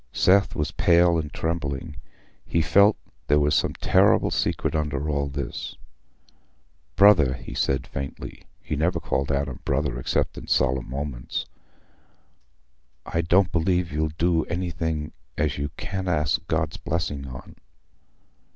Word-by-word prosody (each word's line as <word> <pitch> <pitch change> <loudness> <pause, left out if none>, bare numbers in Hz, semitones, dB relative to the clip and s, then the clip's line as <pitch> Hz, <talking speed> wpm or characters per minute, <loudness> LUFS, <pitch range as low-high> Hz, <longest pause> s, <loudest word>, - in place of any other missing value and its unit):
Seth 100 +2 +3
was 75 - -1
pale 85 -1 +4
and 75 -1 -4
trembling: 80 -2 -3 0.5
he 85 - +1
felt 100 +7 +5 0.3
there 75 - +4
was 75 0 +2
some - - +1
terrible - - +3
secret - - -1
under 75 -2 -1
all 70 -2 0
this. 70 0 -5 1.2
"Brother," 90 -10 +6
he - - -9
said, 65 - 0
faintly—he 70 +2 -7
never 80 +5 0
called 70 +2 -1
Adam 70 -2 -2
"Brother" 70 -3 -1
except - - -1
in - - -12
solemn 65 -1 +1 2.2
moments—"I 85 - -1
don't 90 +2 +3
believe 90 +1 +1
you'll 80 +1 0
do 85 -1 +2
anything 80 -3 -3 0.3
as 75 -1 0
you 70 +1 -2
can't 95 0 -4
ask 80 0 0
God's 80 -1 -1
blessing 75 -5 -3
on." 65 0 -10
75 Hz, 125 wpm, -25 LUFS, 70-85 Hz, 2.2 s, Brother